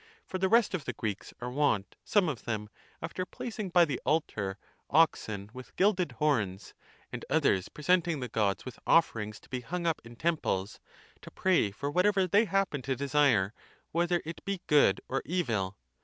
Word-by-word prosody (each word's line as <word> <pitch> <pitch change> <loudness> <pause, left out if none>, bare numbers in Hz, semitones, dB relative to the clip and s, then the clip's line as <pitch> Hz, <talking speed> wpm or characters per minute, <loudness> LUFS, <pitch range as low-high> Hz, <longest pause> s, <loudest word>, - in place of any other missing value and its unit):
For 185 - -4
the 190 0 +2
rest 230 0 +4
of 170 -6 -3
the - - -3
Greeks 105 -4 -4
are 125 0 -4
wont, 125 -8 0
some 205 -4 +3
of 140 -7 -4
them, 105 -3 -3 0.3
after 170 +3 -3
placing 215 +1 -5
(by 175 -1 +5
the 140 -5 -3
altar) 105 -11 -1 0.3
oxen 110 -10 +2
with 130 -1 -11
gilded 185 -7 +2
horns,®°° 110 -8 -1 0.4
and - - -5
others 95 -2 +2
presenting 170 0 +1
the 125 - -3
gods 105 -4 0
with 130 - -8
offerings 110 -10 +2
to - - -20
be 125 -1 -3
hung 170 +7 -4
up 165 -2 0
(in 115 +1 -12
temples), 115 - -1 0.4
to - - -10
pray 185 - +2
for 140 +8 -4
whatever 190 +3 +3
they 205 +5 +4
happen 195 -9 0
(to 135 +1 -1
desire), 135 -7 +2 0.4
whether 175 +1 +1
it 165 +1 -7
be 195 -2 -3
good 140 -10 +4
or 135 +1 -1
evil. 115 - -1
145 Hz, 175 wpm, -30 LUFS, 110-175 Hz, 0.4 s, by